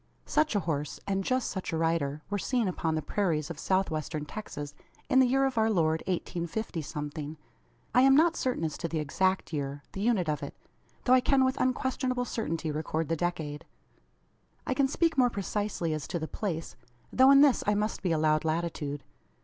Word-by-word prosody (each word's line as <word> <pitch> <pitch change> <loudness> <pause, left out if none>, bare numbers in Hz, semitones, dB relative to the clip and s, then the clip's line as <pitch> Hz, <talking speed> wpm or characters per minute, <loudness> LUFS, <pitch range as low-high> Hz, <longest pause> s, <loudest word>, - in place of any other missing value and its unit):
Such 305 -5 +1
a 205 - +2
horse; 150 -4 -3
and 195 -1 -1
just 255 +3 0
such 190 - -4
a 165 - -1
rider, 155 -3 0
were 205 - 0
seen 240 +4 0
upon 165 -3 -1
the 155 - -2
prairies 165 -5 -1
of 150 - -8
South 190 -1 +1
Western 155 -1 -3
Texas 145 -5 -7 0.4
in 260 - +5
the 260 - +6
year 270 +2 +3
of 260 -4 0
our 220 0 +3
Lord 160 -6 +2
1850 175 +1 -3
something. 150 +1 -5 0.6
I 250 - +6
am 270 +1 +6
not 325 +3 +5
certain 255 -9 -1
as 155 -2 -3
to 170 - -2
the 165 - -3
exact 185 +5 0
year 145 -1 -3
the 195 - -5
unit 210 -6 +2
of 150 -1 -1
it - - -6 0.5
though 255 - +4
I 255 - +6
can 265 0 +3
with 260 0 0
unquestionable 255 0 0
certainty 165 -10 -2
record 155 +1 -2
the 165 - +1
decade. 160 -3 -3 1.0
I - - 0
can 270 +1 +2
speak 320 +1 +1
more 250 -1 +5
precisely 200 -5 -2
as 155 -3 -4
to - - -2
the 160 -1 -4
place; 165 -5 -4 0.4
though 260 +1 +6
in 275 0 +8
this 285 -3 +5
I 210 - +3
must 210 +1 -1
be 180 - 0
allowed 155 -1 +2
latitude. 155 -3 -2
175 Hz, 200 wpm, -29 LUFS, 155-245 Hz, 1.0 s, in